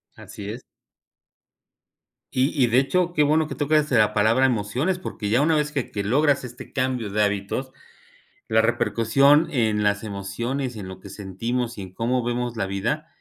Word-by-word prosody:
Así 100 -1 -9
es. 115 +4 -6 1.7
Y 130 +3 +2
y 125 - +5
de 120 +2 +4
hecho, 175 +6 +1
qué 150 - +3
bueno 155 +1 +2
que - - -6
tocas 150 0 +1
la 110 -4 +4
palabra 110 +5 +3
emociones, 125 - 0
porque 105 - -5
ya 120 +5 +3
una 160 +2 +3
vez 150 -1 0
que 140 -4 -3
que 100 - -3
logras 140 +7 +2
este 125 -1 -10
cambio 130 -5 -1
de 105 +2 +1
hábitos, 105 +6 -2 0.8
la 110 0 +3
repercusión 120 +7 +3
en 110 -6 +1
las 100 0 +1
emociones 115 +6 -4
y - - -7
en 95 - -7
lo 95 0 -9
que - - -12
sentimos 115 +5 -3
y - - -5
en 95 -1 -9
cómo 120 +4 0
vemos 120 0 -2
la 95 - -1
vida 115 +11 -2
120 Hz, 180 wpm, -24 LUFS, 105-140 Hz, 1.7 s, y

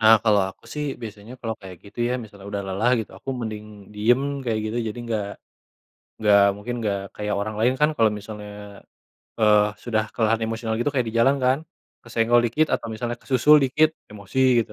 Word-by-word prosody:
Nah, 110 0 +8
kalau 105 -2 +5
aku - - -30
sih 150 - -2 0.2
biasanya 110 +1 -8
kalau 115 -1 -3
kayak 95 -2 -10
gitu 100 - -15
ya - - 0
misalnya 100 -2 -12
udah 100 -1 -2
lelah 100 +6 +1
gitu, 110 - -4
aku - - -6
mending 110 -2 -5 0.3
diem 115 +5 +3 0.2
kayak 115 -3 0
gitu 110 +2 -3
jadi 105 - -6
enggak, 110 -3 -2 0.9
enggak 105 -2 +5 0.2
mungkin 105 +4 -5
enggak 100 -2 0 0.2
kayak 105 0 -2
orang 105 +1 -3
lain 120 +3 +3
kan 150 - +5
kalau 115 -1 +5
misalnya, 105 0 -8 0.9
eee, 105 -1 +6 0.2
sudah 110 -3 +1
kelelahan 115 -1 +1
emosional 115 0 -2
gitu 135 - +1
kayak 125 -4 +1
di 110 - -7
jalan 135 +4 +4
kan 130 +2 +3 0.4
kesenggol 115 +1 +3
dikit 155 +7 +2
atau - - -3
misalnya 120 +2 -3
kesusul 140 +3 +5
dikit 155 +4 +4 0.2
emosi 105 +4 -7 0.3
gitu, 105 - -15
110 Hz, 185 wpm, -24 LUFS, 105-120 Hz, 0.9 s, Nah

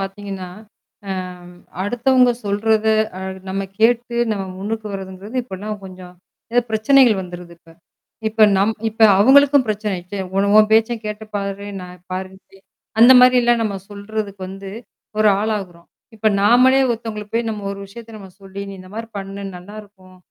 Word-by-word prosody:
பார்த்தீங்கன்னா, 195 -1 -6 0.6
அ - - -3 0.7
அடுத்தவங்க 245 +4 +3
சொல்றத 215 +2 +1 0.3
அ - - -7 0.3
நம்ம 195 +1 -2 0.2
கேட்டு 235 +1 +2 0.2
நம்ம 200 -2 -3
முன்னுக்கு 215 +2 -4
வரதுங்கிறது 195 +4 -7
இப்போலாம் 210 -1 -6
கொஞ்சம் 185 -1 -11 0.4
ஏதோ 245 - +4
பிரச்சனைகள் 220 -1 +4
வந்துருது 175 -1 -10
இப்ப. 165 -1 -21 0.6
இப்ப 220 0 +4
நம் 200 +3 +2 0.2
இப்ப 225 +2 -21 0.2
அவங்களுக்கும் 275 +2 +6
பிரச்சனை 210 -1 -2
ஆச்சே. 185 +3 -7 0.2
"உன 200 +1 +2
உன் 215 0 +5
பேச்சை 225 +2 +3
கேட்டு 210 0 -5
பாரு, 200 0 -4
நான் 180 -1 -11
பாரு 185 +1 -4
இப்டி" 195 0 -22 0.4
அந்த 240 +3 +9
மாதிரிலாம் 245 -2 +5
நம்ம 210 -3 -2 0.2
சொல்றதுக்கு 205 -1 -6
வந்து 195 0 -8 0.5
ஒரு 215 0 +5
ஆளாகுறோம். 195 -6 -4 0.3
இப்போ 215 +1 +2
நாமளே 250 +5 +5
ஒருத்தவங்களுக்கு 220 -2 -5
போய் 230 0 0
நம்ம 210 -2 -6
ஒரு 200 - -9
விஷயத்தை 230 +3 -12
நம்ம 195 -2 -12
சொல்லி, 195 0 -9
"நீ - - -8
இந்த 185 0 -14
மாதிரி 225 +1 -6
பண்ணு 195 0 -7
நல்லாயிருக்கும்" 195 -1 -13
210 Hz, 150 wpm, -19 LUFS, 195-225 Hz, 0.7 s, அந்த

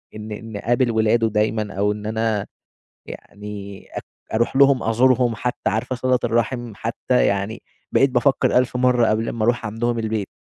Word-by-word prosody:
إن 110 0 -8
إن 110 0 -7
أقابل 120 +3 +1
ولاده 110 +1 +2
دايمًا 105 0 -1
أو 100 +2 +1
إن 105 0 -6
أنا 110 -2 -1 0.6
يعني 100 -1 -9
أك - - -6 0.3
أرُوح 120 +3 0
لهم 140 -1 +5
أزورهم 120 +1 +3
حتى، 125 +3 -2
عارفة 110 +4 -2
صِلة 125 0 +1
الرحِم 120 0 -1
حتى، 115 +3 0
يعني 100 +3 -1 0.3
بقيت 135 - +4
بافكر 125 +1 +2
1.000 125 - -16
مرّة 125 -2 +3
قبْل 110 +1 0
ما 110 -2 -3
أرُوح 120 0 +1
عَندهم 115 +2 -1
البيت. 110 -3 -2
115 Hz, 160 wpm, -21 LUFS, 105-120 Hz, 0.6 s, لهم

